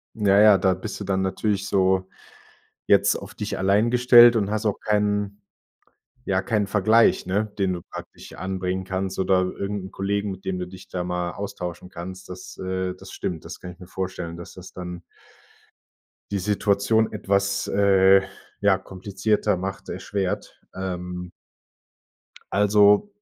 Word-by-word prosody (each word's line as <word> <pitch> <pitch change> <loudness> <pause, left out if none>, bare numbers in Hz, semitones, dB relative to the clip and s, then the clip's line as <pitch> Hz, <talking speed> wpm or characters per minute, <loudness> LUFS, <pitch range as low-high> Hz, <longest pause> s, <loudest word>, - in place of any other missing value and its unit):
Ja, 100 -2 +4
ja, 105 -2 +7
da 95 0 +2
bist 95 +4 -6
du 100 - -4
dann 95 0 0
natürlich 100 +1 -1
so 95 -1 +2 0.8
jetzt - - +4
auf - - -9
dich - - -4
allein 100 +4 +3
gestellt 120 -1 +7
und 100 -2 0
hast 110 +1 -1
auch 105 - -1
keinen 105 -1 0 0.8
ja, - - 0
keinen 105 -3 0
Vergleich, 110 +3 +3
ne? 100 +4 -1
Den 95 -2 +1
du 85 - -5
praktisch - - -11
anbringen 95 0 -3
kannst 95 0 -3
oder 95 0 +3
irgend 100 +1 -3
'n - - -10
Kollegen, 100 +1 -2
mit 95 0 -10
dem 90 -1 -2
du 90 - -4
dich 95 0 -12
da 90 -1 -3
mal 90 -1 -2
austauschen 90 -3 -6
kannst, 90 +2 -9
das 90 0 -9
äh, 95 0 -2
das - - -12
stimmt. 85 -3 -4
Das - - -9
kann 90 - -8
ich 90 - -16
mir 90 - -11
vorstellen, 90 -3 -5
dass 85 - -10
das 90 0 -11
dann 90 -1 -7 1.3
die 100 - -1
Situation 105 +2 +1
etwas, 100 -1 0
äh, 95 -1 +5 0.4
ja, 100 -1 +4
komplizierter 100 +2 -1
macht, 95 +1 -5
erschwert, 100 -2 -4
ähm 90 -1 -5 1.2
also 105 - +5
95 Hz, 155 wpm, -24 LUFS, 95-100 Hz, 1.3 s, ja